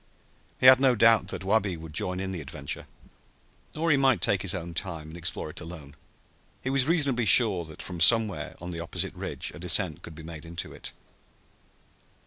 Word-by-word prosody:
He - - 0
had 130 0 +9
no 130 -2 +4
doubt 115 -1 +4
that 95 -1 -4
Wabi 100 -2 +1
would 80 -1 -10
join 90 +3 -3
in 95 0 -4
the 90 -4 -5
adventure. 70 0 -6 0.9
Or 165 +1 +1
he 140 - +4
might 135 -6 +3
take 95 +2 +2
his 100 0 0
own 85 -1 -6
time, 80 -3 -4
and 80 - -10
explore 85 -2 -3
it - - -8
alone. 80 -4 -10 0.7
He 130 - -1
was 135 0 +1
reasonably 140 -8 +2
sure 100 -5 +4
that 80 -1 -10
from 90 -2 -7
somewhere 100 -4 +3
on 85 +1 -7
the 85 - -5
opposite 85 - -3
ridge - - -4
a - - -11
descent 90 -2 0
could 80 - -10
be 80 - -11
made 80 -1 -9
into 85 +1 -6
it. - - -9
90 Hz, 195 wpm, -27 LUFS, 80-115 Hz, 0.9 s, had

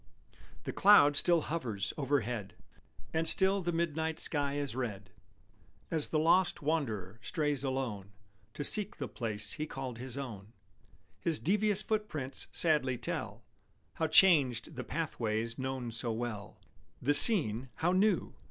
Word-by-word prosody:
The - - -5
cloud 185 -8 +6
still 170 +2 +3
hovers 115 -12 -4
overhead, 125 -8 -2 0.6
And 160 0 0
still 190 +1 +4
the 175 -1 -2
midnight 160 -1 -2
sky 145 -2 +2
is 140 -4 -4
red; 105 -7 -5 0.8
As 160 -3 -1
the 155 - 0
lost 175 +3 +2
wanderer 115 - -3
strays 150 -4 -2
alone 130 -8 -4 0.5
To 145 - -4
seek 210 +6 +2
the 140 -5 -4
place 110 -4 -5
he 155 0 -5
called 130 -5 -7
his 130 +1 -6
own, 110 -6 -8 0.7
His 160 +8 -1
devious 210 +3 0
footprints 170 -12 -3
sadly 150 -6 +2
tell 115 - -5 0.5
How 160 - -1
changed 145 - +4
the 130 - -5
pathways 115 -8 -3
known 130 -2 -4
so 115 +1 -1
well; 110 -3 -6 0.4
The 145 +4 +1
scene, 140 - +6
how 175 +2 0
new! 200 +3 +1
140 Hz, 135 wpm, -31 LUFS, 115-165 Hz, 0.8 s, cloud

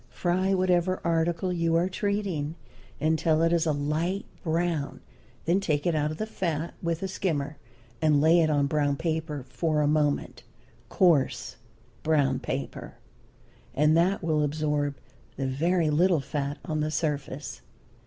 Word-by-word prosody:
Fry 185 +2 0
whatever 185 0 +2
article 170 +2 0
you 165 -1 +1
are 170 +2 +3
treating 190 -6 -2 0.4
until 160 +1 +2
it 165 +1 +3
is 170 -1 +2
a - - +3
light 155 +7 -1 0.2
brown, 165 -3 -1 0.5
then 175 +4 +3
take 155 -6 -1
it 175 - +2
out 150 -1 +1
of 155 - -5
the 215 - -2
fat 170 -6 -3
with 170 +1 -2
a - - 0
skimmer, 155 -6 -2 0.4
and 155 -2 +4
lay 160 +3 +5
it 160 - +2
on 145 -2 +2
brown 145 0 +1
paper 155 -3 -3
for 160 -3 0
a - - +2
moment 150 -1 0 0.5
coarse 165 -8 +2 0.4
brown 145 -5 +2
paper 135 +2 -5 0.8
and 150 +2 +4
that 180 +3 +2
will 155 -2 +1
absorb 150 -1 0 0.4
the 135 - -3
very 160 +5 +1
little 170 +2 +3
fat 140 +1 -3
on 155 -1 -2
the 150 0 0
surface. 145 - -3
160 Hz, 150 wpm, -27 LUFS, 145-175 Hz, 0.8 s, lay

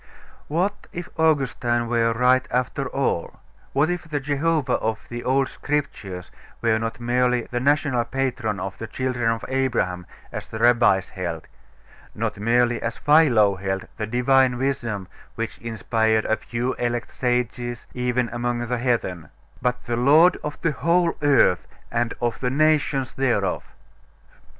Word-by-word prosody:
What 185 +7 -1
if 175 0 -6
Augustine 130 -6 +1
were 115 -1 +2
right 125 +2 +3
after 130 +2 -1
all? 130 -12 -2 0.3
What 140 +3 +2
if 180 -2 -3
the 145 -1 -1
Jehovah 145 -1 +1
of 110 -1 -3
the 120 0 -5
old 135 +1 +2
Scriptures 100 -11 -4 0.3
were 110 -1 +2
not 115 +2 -4
merely 125 +1 +2
the 120 - 0
national 140 -3 +2
patron 125 -6 -2
of 95 +1 -5
the 115 - -5
children 125 -2 -1
of 115 0 -2
Abraham, 120 -10 -1 0.2
as - - -6
the - - -6
Rabbis 120 -6 +4
held; 85 -4 -5 0.7
not - - -3
merely, 120 +2 +2
as 115 0 -3
Philo 125 -10 +4
held, 95 0 -3
the 110 -1 -3
Divine 125 +2 +3
Wisdom 120 -7 -2 0.3
which 115 0 -4
inspired 110 -1 0
a 110 - +2
few 120 +3 -3
elect 120 -1 -2
sages, 120 -1 -2
even 125 0 0
among 120 0 -2
the 120 0 -2
heathen; 115 -9 -1 0.3
but 125 0 -1
the 120 -1 -1
Lord 155 +8 +6
of 150 - -5
the 165 - +1
whole 170 +4 +2
earth, 140 -10 +4 0.2
and 115 0 0
of 120 -2 -1
the 125 - 0
nations 145 -2 +2
thereof? 120 -7 0
125 Hz, 145 wpm, -23 LUFS, 115-135 Hz, 0.7 s, Lord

